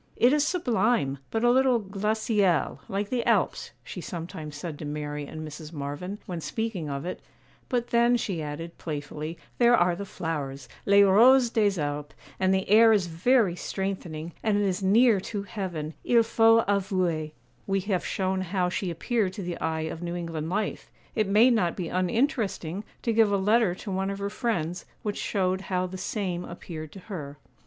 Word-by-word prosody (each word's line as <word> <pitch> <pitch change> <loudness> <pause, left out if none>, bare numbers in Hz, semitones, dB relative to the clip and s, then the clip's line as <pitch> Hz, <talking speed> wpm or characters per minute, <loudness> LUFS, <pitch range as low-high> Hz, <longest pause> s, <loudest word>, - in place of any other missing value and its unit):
'It 245 +3 +4
is 300 0 +3
sublime, 225 - +1
but 225 +1 -1
a 240 - +5
little 260 -1 +4
"glaciale," 210 -2 0
like 200 +1 -2
the 245 -2 0
Alps,' - - +1
she - - -7
sometimes 165 -3 -6
said 150 0 -6
to - - -6
Mary 150 0 -4
and 155 +1 -7
Mrs. 155 +1 -9
Marvyn, 150 +6 -5
when 175 -3 -5
speaking 215 -6 -3
of 140 +1 -4
it; 180 - -5 0.5
'but 245 -2 -1
then,' 235 +1 +4
she 190 -8 -3
added, 155 +3 -6
playfully, 150 +1 -5 0.2
'there 240 0 +6
are 175 0 +3
the 200 - -5
flowers—les 150 +5 0
roses 235 +5 +6
des 205 -5 +2
Alpes; 145 0 -3 0.2
and 190 0 +3
the 190 0 +1
air 225 +2 +7
is 205 -4 +3
very 185 +3 +2
strengthening, 175 -4 -4
and 215 -2 +2
it 205 - +2
is 190 0 -1
near 215 +3 +5
to 200 +1 -4
heaven—il 190 +3 0
faut 225 0 +4
avouer.' 185 -6 0 0.4
We 195 0 +1
have 190 -2 -1
shown 190 0 -1
how 180 0 0
she 185 +1 -2
appeared 190 +3 -1
to 195 - -6
the 175 -1 -4
eye 160 0 -1
of 160 +1 -4
New 175 0 -3
England 165 -2 -4
life; 210 +3 -2 0.2
it 215 -3 +1
may 215 +6 +6
not 185 -8 +1
be 175 -4 -4
uninteresting 195 - 0 0.2
to 230 - +1
give 220 -2 +4
a 200 - +3
letter 210 -1 +3
to 195 - -7
one 190 +1 -1
of 200 - -3
her 200 0 -3
friends, 185 -7 -2 0.2
which 210 -1 -2
showed 190 -2 0
how 185 -1 -1
the 185 +1 -7
same 180 -5 -2
appeared 160 -3 -8
to 195 - -10
her. 150 -8 -7
190 Hz, 180 wpm, -27 LUFS, 165-215 Hz, 0.5 s, air